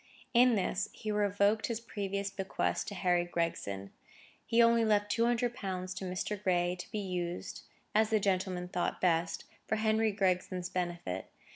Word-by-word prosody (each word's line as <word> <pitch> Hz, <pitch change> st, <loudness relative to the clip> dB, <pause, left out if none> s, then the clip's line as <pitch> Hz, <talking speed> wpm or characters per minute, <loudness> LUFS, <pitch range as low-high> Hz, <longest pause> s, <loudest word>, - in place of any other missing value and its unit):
In 245 Hz, 0 st, +6 dB
this 195 Hz, 0 st, 0 dB
he 215 Hz, -, -4 dB
revoked 205 Hz, +1 st, +2 dB
his 230 Hz, -2 st, -2 dB
previous 200 Hz, -3 st, -3 dB
bequest 195 Hz, -1 st, -1 dB
to 205 Hz, -, -5 dB
Harry 180 Hz, -2 st, +2 dB
Gregson. 130 Hz, -, -3 dB, 0.6 s
He 230 Hz, 0 st, +2 dB
only 230 Hz, 0 st, +6 dB
left 205 Hz, -1 st, +2 dB
two 230 Hz, +2 st, +3 dB
hundred 240 Hz, 0 st, +1 dB
pounds 185 Hz, -4 st, -4 dB
to 190 Hz, -, -5 dB
Mr. 185 Hz, +2 st, -3 dB
Gray 180 Hz, -2 st, +2 dB
to -, -, -7 dB
be 215 Hz, -, -4 dB
used, 180 Hz, -3 st, -3 dB, 0.3 s
as 215 Hz, 0 st, +4 dB
that 215 Hz, -1 st, +2 dB
gentleman 185 Hz, -2 st, 0 dB
thought 180 Hz, 0 st, -2 dB
best, 165 Hz, -2 st, +1 dB, 0.2 s
for -, -, +1 dB
Henry 220 Hz, 0 st, +2 dB
Gregson's 185 Hz, -2 st, 0 dB
benefit. 175 Hz, -, -3 dB
195 Hz, 160 wpm, -32 LUFS, 180-215 Hz, 0.6 s, In